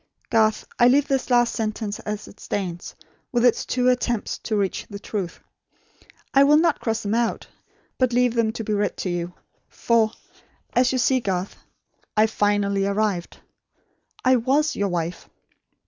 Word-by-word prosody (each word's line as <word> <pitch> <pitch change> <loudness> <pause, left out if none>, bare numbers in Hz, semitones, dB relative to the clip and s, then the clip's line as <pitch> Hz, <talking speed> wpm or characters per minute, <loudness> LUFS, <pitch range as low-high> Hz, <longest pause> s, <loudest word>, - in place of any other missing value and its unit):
Garth, 220 -2 +2
I 240 - +7
leave 280 +3 +4
this 270 -1 -1
last 240 -1 +3
sentence 215 -1 -3
as 210 0 -5
it 205 - -15
stands, 175 -4 -4 0.4
with 240 -1 +2
its 245 - +2
two 250 0 +1
attempts 245 -3 0
to 220 - -3
reach 200 -2 -1
the 205 - -6
truth. 200 -4 -5 0.9
I 275 - +6
will 295 +2 +6
not 325 -1 +2
cross 225 -1 -2
them 205 +1 -1
out, 235 0 0 0.5
but 255 -1 +2
leave 245 0 +2
them 230 -2 +1
to 225 - -5
be 215 - -2
read 205 0 -1
to 185 - -2
you; 175 0 -4 0.3
for, 230 -2 +2 0.6
you 245 - +5
see 255 +1 +3
Garth, 190 -4 -3 0.6
I 215 - +6
finally 205 -2 +1
arrived! 200 -3 -1 0.9
I 255 0 +5
WAS 275 +6 +1
your 200 -1 0
wife. 175 -1 -4
220 Hz, 160 wpm, -23 LUFS, 200-245 Hz, 0.9 s, I